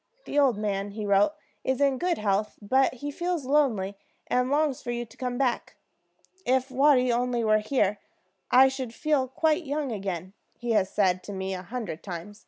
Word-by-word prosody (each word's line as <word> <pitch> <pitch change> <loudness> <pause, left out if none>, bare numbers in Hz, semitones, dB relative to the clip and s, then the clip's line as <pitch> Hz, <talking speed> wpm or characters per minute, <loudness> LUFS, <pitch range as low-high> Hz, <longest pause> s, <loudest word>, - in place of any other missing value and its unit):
"The 290 - 0
old 265 -6 +4
man," 205 -1 -2
he 215 0 -4
wrote, 200 +7 +3 0.3
"is 260 -1 0
in 275 -2 +2
good 355 -2 0
health, 210 0 0
but 260 +6 +2
he 290 +4 -5
feels 345 -1 -2
lonely, 225 -9 +1 0.3
and 250 +1 +1
longs 290 -2 +1
for - - -7
you 240 0 -2
to 225 - -18
come 250 -1 -3
back. 250 -3 -1 0.7
'If 260 -1 +1
Watty 260 -2 +4
only 240 0 0
were 215 -1 +4
here, 210 -3 0 0.5
I 260 +1 +7
should 260 -3 -4
feel 300 -5 +1
quite 315 +6 +1
young 290 -2 -2
again,' 190 -3 -4 0.2
he 240 -1 -3
has 200 -4 +2
said 185 -3 +1
to 205 - -6
me 190 0 -3
a 185 - -4
hundred 200 -4 -5
times. 190 +3 -7
245 Hz, 190 wpm, -27 LUFS, 205-270 Hz, 0.7 s, I